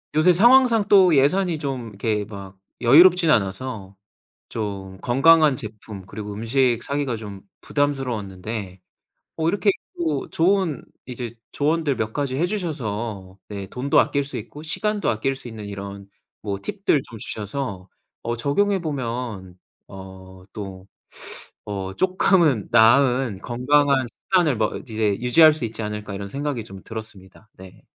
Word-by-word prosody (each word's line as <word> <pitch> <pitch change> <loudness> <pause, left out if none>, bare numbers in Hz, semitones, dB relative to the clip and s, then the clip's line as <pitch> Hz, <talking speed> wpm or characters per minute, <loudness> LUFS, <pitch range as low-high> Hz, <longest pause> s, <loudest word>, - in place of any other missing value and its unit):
요새 155 +4 +5
상황상 235 +1 +5
또 185 -5 +6
예산이 165 +4 +2
좀 130 -5 -4
이렇게 105 0 -2
막 100 -2 -10 0.2
여유롭진 170 +7 +6
않아서 100 -1 -1 0.5
좀 95 -3 -5
건강한 150 +3 +5
제품 105 -3 -9
그리고 105 +1 -7
음식 120 +2 +1
사기가 140 -4 -2
좀 105 -3 -8 0.2
부담스러웠는데 110 -9 -3 0.6
어 160 0 0
이렇게 200 +2 +2 0.3
또 155 -5 -2
좋은 180 -2 +1 0.2
이제 120 -2 -6 0.2
조언들 150 -1 0
몇 110 0 -2
가지 140 -3 -2
해 170 - +2
주셔서 115 - -4
네 100 -2 -6
돈도 130 +6 +1
아낄 140 0 +2
수 140 - -6
있고 150 - -9
시간도 210 +6 -1
아낄 125 +5 -1
수 125 - -9
있는 110 -2 -8
이런 100 0 -8 0.3
뭐 100 -2 -3
팁들 175 - 0
좀 115 - -9
주셔서 105 -4 -5 0.3
어 120 +1 -2
적용해 195 +10 +1
보면 120 - -4 0.3
어 95 -1 -12
또 95 -2 -8 0.8
어' 95 -2 -5
쪼끔은 180 - +2
나은 120 -1 +4
건강한 135 +2 +2
식단을 160 - 0
뭐 110 -1 0
이제 110 -2 0
유지할 155 +5 +6
수 155 - -7
있지 115 0 -6
않을까.' 105 -1 -5
이런 100 0 -5
생각이 140 +1 -3
좀 95 -3 -11
들었습니다. 110 -2 -10
네. 95 -1 -15
120 Hz, 280 characters per minute, -23 LUFS, 100-150 Hz, 0.8 s, 또